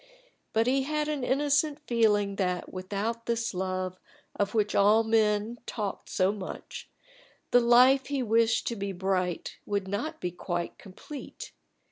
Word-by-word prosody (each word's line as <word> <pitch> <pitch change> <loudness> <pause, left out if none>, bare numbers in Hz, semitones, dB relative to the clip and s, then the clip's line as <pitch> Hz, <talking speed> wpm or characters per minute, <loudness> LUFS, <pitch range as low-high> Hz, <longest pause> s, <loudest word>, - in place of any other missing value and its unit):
But 225 +1 +2
he 265 +2 +2
had 300 +2 -1
an 295 -4 -2
innocent 290 +3 +1
feeling 210 -5 +2
that 180 -3 -2
without 205 +5 -3
this 230 -1 -1
love, 185 0 -3 0.4
of 205 +2 -1
which 210 -1 +1
all 210 +3 +5
men 220 +1 +1
talked 210 -3 -4
so 185 0 +2
much, 200 -3 -8 0.6
the 245 - +7
life 250 +3 +5
he 280 -2 -1
wished 225 0 +2
to 235 - -3
be 200 -2 -4
bright 185 -1 -2
would 200 -2 -2
not 295 +12 -3
be 180 - -3
quite 175 0 -4
complete. 240 +9 -9
215 Hz, 145 wpm, -28 LUFS, 195-245 Hz, 0.6 s, the